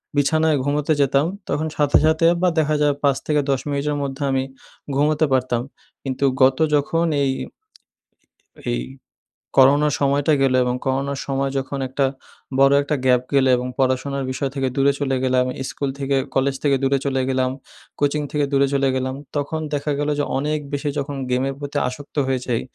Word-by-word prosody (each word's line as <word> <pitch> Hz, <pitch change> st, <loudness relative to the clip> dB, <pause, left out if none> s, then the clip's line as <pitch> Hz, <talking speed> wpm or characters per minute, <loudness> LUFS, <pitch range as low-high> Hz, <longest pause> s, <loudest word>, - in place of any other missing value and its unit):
বিছানায় 155 Hz, +2 st, +2 dB
ঘুমোতে 145 Hz, +2 st, +1 dB
যেতাম, 140 Hz, +1 st, +3 dB, 0.2 s
তখন 155 Hz, +2 st, -1 dB
সাথে, 145 Hz, -1 st, +4 dB
সাথে 160 Hz, +1 st, +3 dB, 0.2 s
বা 180 Hz, -, +4 dB
দেখা 155 Hz, 0 st, +1 dB
যায় 145 Hz, -1 st, +3 dB
৫ 140 Hz, -2 st, +3 dB
থেকে 150 Hz, -1 st, +2 dB
১০ 135 Hz, -1 st, +2 dB
মিনিটের 145 Hz, +1 st, -1 dB
মধ্যে 135 Hz, +1 st, -5 dB
আমি 130 Hz, 0 st, +1 dB, 0.5 s
ঘুমোতে 150 Hz, +2 st, +2 dB
পারতাম। 125 Hz, -2 st, +1 dB, 0.4 s
কিন্তু 135 Hz, 0 st, -3 dB, 0.2 s
গত 130 Hz, 0 st, +5 dB, 0.2 s
যখন 165 Hz, +4 st, +1 dB, 0.2 s
এই 135 Hz, -, +2 dB, 1.4 s
এই 120 Hz, -, 0 dB, 0.8 s
করোনার 145 Hz, +2 st, +5 dB
সময়টা 140 Hz, +2 st, +2 dB
গেলো 130 Hz, -1 st, +3 dB
এবং 125 Hz, 0 st, -1 dB
করোনার 135 Hz, +1 st, -1 dB
সময় 135 Hz, 0 st, -1 dB
যখন 135 Hz, +1 st, -3 dB
একটা 135 Hz, +1 st, +1 dB, 0.5 s
বড়ো 135 Hz, +1 st, +6 dB
একটা 150 Hz, +1 st, -1 dB
গ্যাপ 125 Hz, -1 st, +4 dB
গেলো 135 Hz, -1 st, +4 dB
এবং 125 Hz, +1 st, -3 dB
পড়াশোনার 135 Hz, +1 st, 0 dB
বিষয় 135 Hz, +1 st, -2 dB
থেকে 135 Hz, -1 st, 0 dB
দূরে 140 Hz, 0 st, +4 dB
চলে 135 Hz, -2 st, 0 dB
গেলাম। 130 Hz, -1 st, +2 dB, 0.2 s
ইস্কুল 140 Hz, +1 st, -3 dB
থেকে 140 Hz, 0 st, 0 dB, 0.2 s
কলেজ 135 Hz, +1 st, +1 dB
থেকে 140 Hz, -2 st, +3 dB
দূরে 135 Hz, +1 st, +3 dB
চলে 135 Hz, -1 st, 0 dB
গেলাম, 130 Hz, -1 st, +1 dB, 0.5 s
কোচিং 145 Hz, +1 st, +1 dB
থেকে 145 Hz, -1 st, +1 dB
দূরে 140 Hz, 0 st, +3 dB
চলে 135 Hz, -1 st, +2 dB
গেলাম। 130 Hz, 0 st, -2 dB, 0.2 s
তখন 145 Hz, +2 st, -2 dB
দেখা 145 Hz, +1 st, -1 dB
গেলো 145 Hz, 0 st, 0 dB
যে -, -, +2 dB
অনেক 150 Hz, +2 st, -1 dB
বেশি 145 Hz, +1 st, -1 dB
যখন 140 Hz, 0 st, -3 dB
গেমের 130 Hz, +2 st, 0 dB
প্রতি 145 Hz, 0 st, -4 dB
আসক্ত 140 Hz, +4 st, -8 dB
হয়ে 130 Hz, -1 st, 0 dB
যাই। 120 Hz, -2 st, 0 dB
140 Hz, 170 wpm, -21 LUFS, 135-145 Hz, 1.4 s, বড়ো